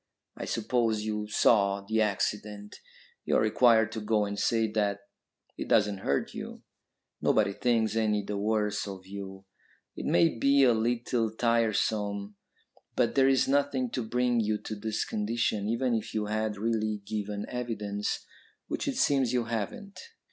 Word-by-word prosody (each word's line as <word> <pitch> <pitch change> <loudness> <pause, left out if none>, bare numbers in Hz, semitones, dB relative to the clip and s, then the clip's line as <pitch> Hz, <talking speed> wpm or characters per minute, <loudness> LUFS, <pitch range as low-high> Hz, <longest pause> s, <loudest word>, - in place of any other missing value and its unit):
"I - - -6
suppose 115 -1 0
you 105 -1 -3
saw 100 -2 +3
the 110 +3 0
accident. 105 0 -2 0.5
You - - 0
are - - +5
required 115 -3 +4
to 110 - -5
go 105 0 +1
and 100 0 -4
say 115 +1 +2
that; 100 -2 0 0.6
it - - -4
doesn't 105 -2 +2
hurt 70 -7 -1
you. - - -8 0.6
Nobody 100 -2 +2
thinks 115 0 +1
any 105 -2 +1
the 105 +1 -4
worse 105 0 0
of 95 -2 -8
you. 95 0 -8 0.5
It - - -5
may 85 +6 +3
be 140 +2 +4
a 125 -2 +6
little 115 0 0
tiresome, 110 -3 0 0.6
but - - +2
there 135 -1 +4
is 135 -1 +3
nothing 135 -3 +1
to 125 - -2
bring 120 +1 +1
you 110 -1 +1
to 110 - -5
this 110 +1 -2
condition, 105 -1 -1
even 120 +2 0
if 110 -1 -3
you 105 -1 0
had 110 0 -2
really 110 -1 -1
given 105 0 -4
evidence, 105 -4 -3 0.4
which - - -3
it - - -1
seems 135 -4 +2
you 125 -1 +2
haven't." 115 - -5
110 Hz, 155 wpm, -29 LUFS, 105-115 Hz, 0.6 s, a